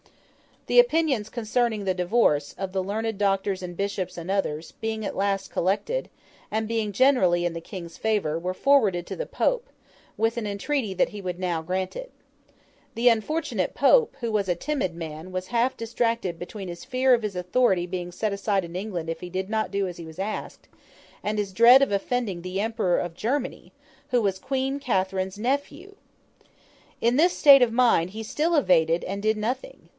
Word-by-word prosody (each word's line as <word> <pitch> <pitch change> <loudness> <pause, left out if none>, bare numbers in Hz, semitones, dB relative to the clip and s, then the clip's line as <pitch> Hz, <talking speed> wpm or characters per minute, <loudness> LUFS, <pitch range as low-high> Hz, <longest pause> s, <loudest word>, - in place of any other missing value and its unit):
The - - +4
opinions 315 - +3
concerning 225 -2 -1
the 190 - +1
divorce, 180 -6 +1
of 190 -1 -4
the 190 0 -1
learned 220 +2 -2
doctors 195 -1 0
and 175 -1 -6
bishops 200 -3 -3
and 170 +2 -4
others, 165 -5 -2
being 220 0 -3
at - - -4
last 195 0 -1
collected, 210 - -1 0.4
and 220 0 -1
being 220 -2 -1
generally 190 -8 +3
in 175 - -1
the 165 - -6
King's 170 -2 -9
favour, 200 -8 0
were 180 +2 -3
forwarded 205 -7 +3
to - - -5
the - - -4
Pope, - - 0 0.5
with 225 +2 +1
an 220 -3 -2
entreaty 210 +2 -2
that - - +2
he 210 - -8
would 180 -2 -4
now 175 -3 -1
grant 185 +3 -3
it. - - -7 0.8
The 240 +2 +5
unfortunate 275 +9 -1
Pope, 470 - +4
who 235 -1 -2
was 205 -2 0
a 175 - +1
timid 190 - -2
man, 160 +1 -7
was 185 0 -4
half 240 +2 +1
distracted 230 -6 -1
between 190 +2 -7
his 175 -1 -8
fear 255 0 +3
of 240 - +3
his 205 -3 -3
authority 180 0 +2
being 180 0 -5
set 210 +3 -2
aside 200 -1 0
in 170 +1 -10
England 180 -4 -4
if 165 - -3
he 180 - -6
did 190 +2 -3
not 220 0 -1
do 200 -1 0
as 175 - -7
he 170 - -8
was 160 +2 -11
asked, 210 +3 -5 0.6
and 210 +1 -1
his 200 -2 -2
dread 240 +6 +8
of 275 - 0
offending 200 -2 -1
the 185 +2 -4
Emperor 220 -5 0
of 175 -1 -4
Germany, 260 +7 -3 0.4
who 245 -1 +2
was 195 -3 0
Queen 270 +3 -2
Catherine's 190 -5 -1
nephew. 285 - -3 1.1
In 240 +2 +2
this 345 +4 +3
state 280 -2 +8
of 235 -2 +3
mind 230 -8 +3
he 220 +2 -6
still 315 +9 0
evaded 170 - +3
and 200 +2 -4
did 215 +1 +1
nothing. 250 - -4
205 Hz, 190 wpm, -25 LUFS, 185-240 Hz, 1.1 s, dread